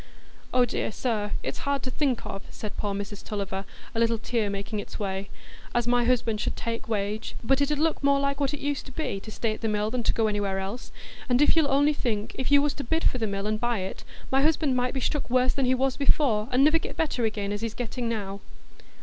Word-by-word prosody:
"Oh 250 Hz, -1 st, +4 dB
dear, 225 Hz, -, -2 dB
sir, 210 Hz, -3 st, -1 dB
it's -, -, -3 dB
hard 280 Hz, -2 st, -1 dB
to 255 Hz, -, -3 dB
think 270 Hz, -3 st, 0 dB
of," 195 Hz, -, -5 dB
said 210 Hz, -, -6 dB
poor 205 Hz, -1 st, -2 dB
Mrs 200 Hz, 0 st, -5 dB
Tulliver, 195 Hz, -2 st, -3 dB, 0.3 s
a 225 Hz, -, -1 dB
little 230 Hz, 0 st, +3 dB
tear 220 Hz, -1 st, -1 dB
making 200 Hz, +2 st, -3 dB
its -, -, -6 dB
way, 195 Hz, -1 st, -3 dB, 0.5 s
"as 240 Hz, -1 st, +3 dB
my 245 Hz, 0 st, +3 dB
husband 230 Hz, -3 st, +1 dB
should -, -, -1 dB
take 230 Hz, -1 st, -4 dB
wage. 210 Hz, +1 st, -2 dB
But 270 Hz, +4 st, +3 dB
it 280 Hz, +1 st, +2 dB
'ud 295 Hz, -, +1 dB
look 315 Hz, 0 st, +1 dB
more 280 Hz, 0 st, +4 dB
like 280 Hz, 0 st, 0 dB
what 280 Hz, -2 st, +1 dB
used 290 Hz, -1 st, -2 dB
to -, -, -8 dB
be, 265 Hz, -8 st, -2 dB
to 215 Hz, -, -10 dB
stay 215 Hz, +1 st, -1 dB
at -, -, -9 dB
the 225 Hz, -, 0 dB
mill 210 Hz, 0 st, 0 dB
than 250 Hz, 0 st, 0 dB
to -, -, +2 dB
go 225 Hz, -, +2 dB
anywhere 205 Hz, -2 st, 0 dB
else; 195 Hz, +5 st, -5 dB, 0.4 s
and 245 Hz, 0 st, +4 dB
if 295 Hz, -, +5 dB
you'll 315 Hz, -3 st, +4 dB
only 285 Hz, +2 st, +4 dB
think—if 235 Hz, -1 st, -2 dB
you 285 Hz, 0 st, +7 dB
was 295 Hz, -1 st, +1 dB
to 285 Hz, -, -5 dB
bid 320 Hz, +6 st, 0 dB
for 255 Hz, -, +2 dB
the 220 Hz, -, 0 dB
mill 200 Hz, 0 st, -2 dB
and 215 Hz, 0 st, 0 dB
buy 240 Hz, -3 st, 0 dB
it, 190 Hz, -, -5 dB, 0.3 s
my 270 Hz, +1 st, +4 dB
husband 300 Hz, -2 st, +3 dB
might 250 Hz, +1 st, 0 dB
be 265 Hz, -, -1 dB
struck 295 Hz, +2 st, -1 dB
worse 255 Hz, +1 st, +3 dB
than 275 Hz, -, +1 dB
he 255 Hz, -, +4 dB
was 265 Hz, 0 st, +1 dB
before, 260 Hz, -6 st, +2 dB
and 255 Hz, +2 st, +5 dB
niver 310 Hz, +3 st, +5 dB
get -, -, -7 dB
better 300 Hz, -7 st, 0 dB
again 210 Hz, -2 st, -1 dB
as 205 Hz, +1 st, -3 dB
he's 225 Hz, -1 st, -3 dB
getting 245 Hz, 0 st, -3 dB
now." 200 Hz, -3 st, -3 dB
235 Hz, 245 wpm, -27 LUFS, 210-275 Hz, 0.5 s, you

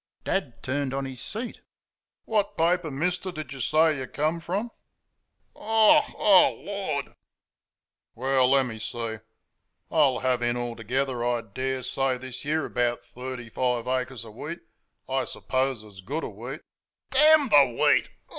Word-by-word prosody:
Dad 145 Hz, -12 st, -2 dB
turned 135 Hz, 0 st, -1 dB
on 135 Hz, 0 st, -2 dB
his 130 Hz, -2 st, -5 dB
seat. 230 Hz, +3 st, -4 dB, 0.6 s
"What 210 Hz, -2 st, 0 dB
paper, 170 Hz, 0 st, +2 dB
mister, 180 Hz, +6 st, -2 dB
do 155 Hz, -3 st, -5 dB
you 140 Hz, -1 st, -8 dB
say 155 Hz, +2 st, +3 dB
you 130 Hz, -, -5 dB
come 155 Hz, +5 st, -1 dB
from?" 200 Hz, +8 st, -3 dB, 0.8 s
"OH 220 Hz, 0 st, +5 dB
H!...Oh 195 Hz, -3 st, +4 dB
h, -, -, -17 dB
Lord!" 195 Hz, -9 st, -2 dB, 1.1 s
"Well, 130 Hz, +1 st, +2 dB
let 135 Hz, 0 st, +4 dB
me 110 Hz, -3 st, -6 dB
see; 115 Hz, 0 st, -4 dB, 0.7 s
I'll 145 Hz, -5 st, +3 dB
have 130 Hz, -1 st, +1 dB
in 120 Hz, 0 st, +1 dB
altogether, 120 Hz, +2 st, -2 dB
I 120 Hz, -1 st, +1 dB
daresay, 130 Hz, +3 st, -2 dB
this 130 Hz, 0 st, -8 dB
year, 155 Hz, +1 st, 0 dB
about 120 Hz, -1 st, -1 dB
thirty 125 Hz, -1 st, -7 dB
five 125 Hz, +1 st, -1 dB
acres 130 Hz, -2 st, -2 dB
of 110 Hz, -, -11 dB
wheat 150 Hz, +9 st, -7 dB, 0.5 s
I 135 Hz, 0 st, 0 dB
suppose 130 Hz, -3 st, -2 dB
as 100 Hz, -3 st, -13 dB
good 145 Hz, +12 st, -4 dB
a -, -, -3 dB
wheat 120 Hz, +8 st, -8 dB, 0.3 s
" -, -, -66 dB
"Damn 300 Hz, 0 st, +6 dB
the 140 Hz, -, +5 dB
wheat!... -, -, +4 dB
130 Hz, 150 wpm, -26 LUFS, 120-160 Hz, 1.1 s, Damn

